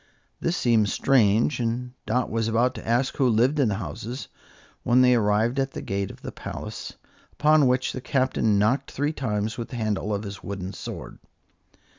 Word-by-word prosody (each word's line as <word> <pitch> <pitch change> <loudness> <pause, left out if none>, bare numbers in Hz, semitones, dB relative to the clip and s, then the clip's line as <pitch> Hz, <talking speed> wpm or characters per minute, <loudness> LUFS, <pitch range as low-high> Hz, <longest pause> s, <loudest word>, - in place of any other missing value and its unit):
This 170 +1 -1
seemed 110 -4 +3
strange, 120 +1 +3
and 120 +1 -2 0.2
Dot 125 +3 0
was 115 0 0
about 120 +3 +2
ask 120 +3 0
who 130 -3 +3
lived 125 +7 +3
in 135 - +4
the 105 - 0
houses, 110 - -6 0.5
when 125 +1 +4
they 125 0 +6
arrived 110 +3 +2
at 135 0 -1
the - - -5
gate 100 0 -2
of - - -12
the - - -5
palace, - - -7 0.4
upon 150 -2 +4
which 125 +1 +1
the 130 - -5
Captain 130 -6 +1
knocked 110 +7 +1
three 145 +3 -1
times 110 -4 -2
with 115 - -4
the - - -7
handle 110 -2 -1
of 100 0 -1
his 100 -2 -7
wooden 95 0 -5
sword. - - -8
115 Hz, 180 wpm, -25 LUFS, 105-130 Hz, 0.5 s, they